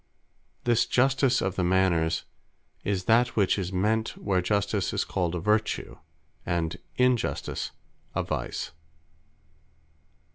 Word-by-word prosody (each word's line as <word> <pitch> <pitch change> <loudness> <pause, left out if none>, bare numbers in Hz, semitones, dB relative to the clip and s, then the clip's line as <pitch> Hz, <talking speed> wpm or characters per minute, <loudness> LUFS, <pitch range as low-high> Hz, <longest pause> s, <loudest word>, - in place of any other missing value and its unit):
This 120 -2 +3
Justice 130 0 +3
of 95 -1 -1
the 90 - 0
Manners, 85 -3 +2 0.6
is 100 -2 -1
that 120 +4 +3
which 100 -1 +3
is 90 -1 -3
meant, 110 +4 0
where 95 -3 +1
Justice 100 0 0
is - - 0
called 90 -2 -1
a - - -1
Vertue; 105 +4 0 0.4
and 85 -2 -1 0.2
Injustice 125 -2 +1 0.5
a - - +1
Vice. - - -3
100 Hz, 115 wpm, -27 LUFS, 90-110 Hz, 0.6 s, This